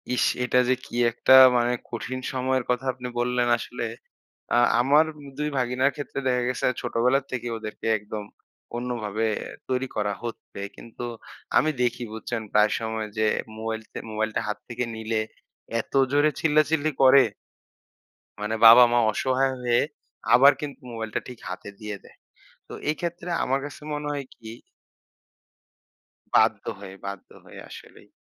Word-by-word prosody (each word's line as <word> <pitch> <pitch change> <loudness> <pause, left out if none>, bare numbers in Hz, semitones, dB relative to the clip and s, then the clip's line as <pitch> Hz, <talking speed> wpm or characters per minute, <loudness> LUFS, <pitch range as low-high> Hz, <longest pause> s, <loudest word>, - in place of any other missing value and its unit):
ইস! - - +2 0.2
এটা 125 0 +3
যে - - +5
কি - - -10 0.2
একটা 120 +3 +3 0.2
মানে 120 0 +2 0.2
কঠিন 125 +2 -4
সময়ের 130 0 0
কথা 125 +2 0
আপনি 125 0 -7
বললেন 125 0 +1
আসলে। 120 0 -5 0.7
আ - - +4 0.2
আমার 145 +5 +5
উম 145 - -12
২ 150 0 0
ভাগিনার 125 +2 +1
ক্ষেত্রে 145 -1 -6
দেখা 125 -1 +2
গেছে 125 - -1
ছোটবেলা 125 +2 +2
থেকেই 120 -2 -3
ওদেরকে 110 0 -7
একদম 105 0 -7 0.5
অন্যভাবে 115 -3 -2 0.4
তৈরি 130 0 0
করা 105 -1 0
হচ্ছে। 115 -3 -7 0.2
কিন্তু 115 +1 -9 0.5
আমি 155 - +3
দেখি, 120 0 0
বুঝছেন? 115 +1 -4
প্রায় 105 0 +4
সময় 110 -1 -3
যে 110 - +3 0.3
মোবাইলতে 110 0 -5
মোবাইলটা 110 0 -1
হাত 105 - -2
থেকে 120 +1 -2
নিলে, 110 0 -1 0.6
এত - - -10 0.2
জোরে 145 +2 +4
চিল্লাচিল্লি 155 0 +2
করে! 135 +1 +8 1.2
মানে 105 +2 -1
বাবা-মা 120 +1 +9
অসহায় 130 +3 +1
হয়ে 120 -1 +2 0.5
আবার 135 +4 +8
কিন্তু 145 -2 -6
মোবাইলটা 110 -2 -3
ঠিক 125 -2 -10
হাতে - - -7
দিয়ে 105 -1 -5
দেয়। - - -18 0.5
তো - - -10 0.2
এক্ষেত্রে 170 +3 -3
আমার 135 +1 +1
কাছে 145 - -9
মনে 150 0 -3
হয় 140 -1 -4
কি 115 - -14 1.9
বাধ্য - - +4 0.2
হয়ে, 95 -1 -9
বাধ্য 100 -1 -7 0.2
হয়ে - - -12
আসলেই। - - -13
125 Hz, 145 wpm, -25 LUFS, 110-130 Hz, 1.9 s, বাবা-মা